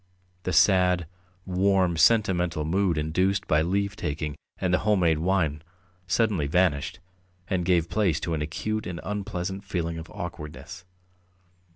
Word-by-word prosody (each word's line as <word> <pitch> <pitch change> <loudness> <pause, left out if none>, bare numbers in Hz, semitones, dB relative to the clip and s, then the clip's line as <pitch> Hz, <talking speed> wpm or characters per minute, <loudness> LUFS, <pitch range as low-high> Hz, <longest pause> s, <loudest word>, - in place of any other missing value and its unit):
The 95 - 0
sad, 90 +1 +4 0.4
warm, 95 -1 +2
sentimental 90 -5 +3
mood 90 0 +1
induced 90 +6 0
by 75 0 +3
leave 100 +4 0
taking 75 -3 -3 0.2
and 90 -1 -1
the 90 - +4
home 105 -2 +2
made 80 -3 +3
wine 80 -4 0 0.5
suddenly 90 -3 +1
vanished, 80 -3 +1 0.5
and 90 -2 0
gave 85 -2 +2
place 95 -7 +1
to 85 - -2
an 80 - -1
acute 105 +8 -3
and 90 -1 -5
unpleasant 95 -1 -4
feeling 85 -4 -3
of 80 - -9
awkwardness. 85 +2 -8
90 Hz, 140 wpm, -26 LUFS, 80-95 Hz, 0.5 s, sad